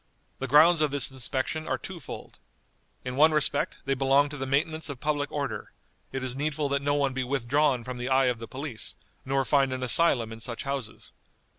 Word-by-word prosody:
"The 135 Hz, -, -3 dB
grounds 155 Hz, +5 st, +6 dB
of 150 Hz, -, +3 dB
this 140 Hz, -2 st, +1 dB
inspection 135 Hz, +4 st, -3 dB
are -, -, 0 dB
two 185 Hz, -2 st, -7 dB
fold. 140 Hz, -, -9 dB, 0.7 s
In 125 Hz, 0 st, -4 dB
one 155 Hz, +3 st, +5 dB
respect 145 Hz, -1 st, +1 dB
they 135 Hz, -, +1 dB
belong 135 Hz, +2 st, +3 dB
to 145 Hz, -, -7 dB
the 135 Hz, -1 st, -4 dB
maintenance 155 Hz, +4 st, 0 dB
of 140 Hz, -3 st, -6 dB
public 145 Hz, 0 st, -1 dB
order: 140 Hz, -6 st, -4 dB, 0.4 s
it 135 Hz, -1 st, -4 dB
is 130 Hz, -1 st, -1 dB
needful 145 Hz, +1 st, -1 dB
that 140 Hz, 0 st, 0 dB
no 145 Hz, +1 st, +1 dB
one 140 Hz, -2 st, +1 dB
be 130 Hz, 0 st, -1 dB
withdrawn 135 Hz, 0 st, +1 dB
from 125 Hz, +1 st, -6 dB
the 125 Hz, +2 st, -3 dB
eye 135 Hz, 0 st, +4 dB
of 125 Hz, -2 st, 0 dB
the 115 Hz, -, -7 dB
police, 130 Hz, -4 st, -5 dB, 0.3 s
nor 135 Hz, 0 st, 0 dB
find 135 Hz, 0 st, +3 dB
an 130 Hz, 0 st, -3 dB
asylum 125 Hz, -4 st, +3 dB
in 115 Hz, -, -10 dB
such 115 Hz, +2 st, -4 dB
houses. 135 Hz, -5 st, -5 dB
135 Hz, 205 wpm, -27 LUFS, 130-145 Hz, 0.7 s, grounds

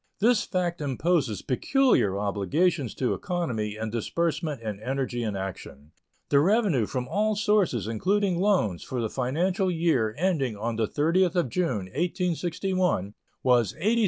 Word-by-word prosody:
This 230 Hz, +1 st, +4 dB
fact 175 Hz, -3 st, -2 dB
imposes 140 Hz, -, 0 dB
peculiar 135 Hz, -, +2 dB
obligations 110 Hz, -, 0 dB
to 130 Hz, -, 0 dB
economy 120 Hz, -, -2 dB
in 110 Hz, 0 st, -4 dB
disbursement 150 Hz, +4 st, -1 dB
and 105 Hz, -2 st, -5 dB
energy 130 Hz, 0 st, -2 dB
in 110 Hz, -3 st, -2 dB
action. 80 Hz, -6 st, -7 dB, 0.4 s
The 140 Hz, -, +5 dB
revenue 180 Hz, -, +2 dB
from 125 Hz, -1 st, -3 dB
all 215 Hz, +7 st, +1 dB
sources, 205 Hz, -, +1 dB
including 185 Hz, -, 0 dB
loans, 180 Hz, -, +1 dB
for 130 Hz, -, -4 dB
the 115 Hz, -2 st, -2 dB
financial 175 Hz, +9 st, 0 dB
year 160 Hz, -11 st, +1 dB
ending 150 Hz, -, 0 dB
on 115 Hz, +2 st, -2 dB
the 110 Hz, -1 st, +1 dB
30th 170 Hz, -, +2 dB
of 175 Hz, -8 st, +1 dB
June, 125 Hz, -, -1 dB
1861, 175 Hz, -, -1 dB, 0.3 s
was 120 Hz, -3 st, +3 dB
$86,835,900. 215 Hz, +9 st, +1 dB
150 Hz, 140 wpm, -26 LUFS, 110-180 Hz, 0.4 s, The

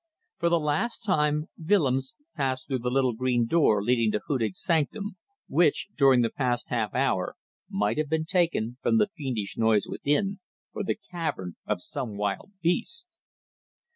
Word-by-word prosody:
For 170 Hz, -, +2 dB
the 170 Hz, 0 st, +3 dB
last 155 Hz, +12 st, -1 dB
time 150 Hz, -6 st, +2 dB, 0.2 s
Willems 140 Hz, -, +2 dB, 0.2 s
passed 130 Hz, -2 st, -1 dB
through 130 Hz, -3 st, -1 dB
the 125 Hz, +1 st, -1 dB
little 130 Hz, -1 st, +2 dB
green 120 Hz, 0 st, +1 dB
door 115 Hz, -8 st, +3 dB
leading 115 Hz, -1 st, +2 dB
to 105 Hz, -, 0 dB
Hudig's 115 Hz, -9 st, -1 dB
sanctum, 185 Hz, +6 st, 0 dB, 0.3 s
which, 155 Hz, 0 st, +2 dB
during 135 Hz, -3 st, +5 dB
the 115 Hz, -, 0 dB
past 120 Hz, -3 st, -1 dB
half 110 Hz, -5 st, -1 dB
hour, -, -, +1 dB, 0.3 s
might 105 Hz, +6 st, 0 dB
have 155 Hz, -2 st, -1 dB
been 160 Hz, 0 st, 0 dB
taken 165 Hz, -, +1 dB
from 230 Hz, -, +3 dB
the 210 Hz, -1 st, +3 dB
fiendish 125 Hz, -, -3 dB
noise 110 Hz, -2 st, +3 dB
within 195 Hz, +8 st, 0 dB, 0.3 s
for -, -, -3 dB
the 205 Hz, -, -1 dB
cavern 155 Hz, -, -3 dB
of -, -, -1 dB
some 110 Hz, -5 st, -4 dB
wild 100 Hz, -, -2 dB
beast. 315 Hz, -, -1 dB
135 Hz, 160 wpm, -27 LUFS, 115-170 Hz, 0.3 s, during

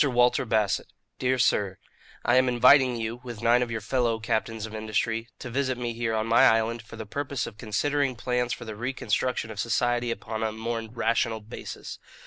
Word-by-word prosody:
WALTER 125 Hz, -2 st, +3 dB
BASSETT, 110 Hz, -3 st, +1 dB, 0.3 s
"DEAR 130 Hz, 0 st, +1 dB
SIR: 100 Hz, -6 st, +2 dB, 0.5 s
"I 120 Hz, +2 st, +4 dB
am 130 Hz, 0 st, +4 dB
inviting 125 Hz, +1 st, +6 dB
you, 115 Hz, +1 st, -4 dB
with 120 Hz, -3 st, -8 dB
nine 120 Hz, +2 st, +5 dB
of 125 Hz, -, -1 dB
your 110 Hz, -1 st, -3 dB
fellow 115 Hz, 0 st, 0 dB
captains 110 Hz, -1 st, -2 dB
of 110 Hz, -, -9 dB
industry, 110 Hz, +1 st, -1 dB
to 125 Hz, -, -7 dB
visit 130 Hz, 0 st, 0 dB
me 120 Hz, -1 st, -3 dB
here 115 Hz, -1 st, -1 dB
on 110 Hz, 0 st, 0 dB
my 115 Hz, +2 st, +4 dB
island 115 Hz, +1 st, +2 dB
for 110 Hz, -, -12 dB
the 110 Hz, 0 st, -6 dB
purpose 140 Hz, +3 st, -3 dB
of 110 Hz, -, -10 dB
considering 135 Hz, +5 st, 0 dB
plans 125 Hz, +1 st, -1 dB
for -, -, -4 dB
the 110 Hz, -1 st, -6 dB
reconstruction 120 Hz, 0 st, -1 dB
of 105 Hz, -, -8 dB
society 120 Hz, +1 st, +1 dB
upon 115 Hz, -1 st, -4 dB
a 110 Hz, -1 st, 0 dB
more 115 Hz, +1 st, -3 dB
rational 115 Hz, -1 st, 0 dB
basis. 110 Hz, +1 st, -8 dB
115 Hz, 190 wpm, -27 LUFS, 110-125 Hz, 0.5 s, inviting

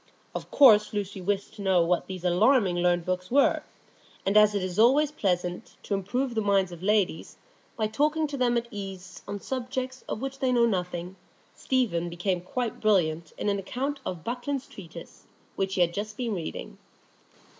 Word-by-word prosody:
Of -, -, -6 dB
course 215 Hz, -7 st, +6 dB
Lucy 200 Hz, -2 st, -3 dB
wished 200 Hz, +2 st, -2 dB
to 210 Hz, -, -10 dB
know 190 Hz, -3 st, +3 dB
what 175 Hz, +1 st, 0 dB
these 185 Hz, -2 st, -7 dB
alarmingly 185 Hz, 0 st, +3 dB
learned 175 Hz, -1 st, +2 dB
books 185 Hz, 0 st, -2 dB
were; 275 Hz, +3 st, +3 dB, 0.6 s
and 195 Hz, -, +1 dB
as 210 Hz, 0 st, +6 dB
it 200 Hz, -, 0 dB
is 185 Hz, +1 st, -3 dB
always 280 Hz, +6 st, +5 dB
pleasant 180 Hz, -, -2 dB
to -, -, -3 dB
improve 240 Hz, +7 st, -1 dB
the 220 Hz, -, 0 dB
minds 195 Hz, -3 st, +2 dB
of 175 Hz, -1 st, -9 dB
ladies 200 Hz, -4 st, 0 dB, 0.4 s
by 220 Hz, -, +1 dB
talking 300 Hz, +8 st, +1 dB
to 290 Hz, -1 st, -4 dB
them 245 Hz, -2 st, +2 dB
at 235 Hz, 0 st, -2 dB
ease 190 Hz, -2 st, -8 dB
on 205 Hz, -, -4 dB
subjects 255 Hz, +2 st, -4 dB
of -, -, -3 dB
which 270 Hz, +1 st, -5 dB
they 260 Hz, -1 st, +1 dB
know 240 Hz, -1 st, +4 dB
nothing, 180 Hz, -3 st, -2 dB, 0.4 s
Stephen 205 Hz, -10 st, 0 dB
became 175 Hz, +1 st, -1 dB
quite 235 Hz, +5 st, -4 dB
brilliant 170 Hz, -6 st, +1 dB
in -, -, -3 dB
an 200 Hz, -1 st, +1 dB
account 270 Hz, +8 st, -3 dB
of 175 Hz, -4 st, -5 dB
Buckland's 255 Hz, +3 st, -3 dB
Treatise, 170 Hz, -3 st, -12 dB, 0.3 s
which 195 Hz, -1 st, -1 dB
he 185 Hz, -, +1 dB
had 170 Hz, -1 st, +3 dB
just 210 Hz, +2 st, -5 dB
been 240 Hz, -3 st, -2 dB
reading. 170 Hz, -5 st, -6 dB
205 Hz, 180 wpm, -27 LUFS, 180-245 Hz, 0.6 s, course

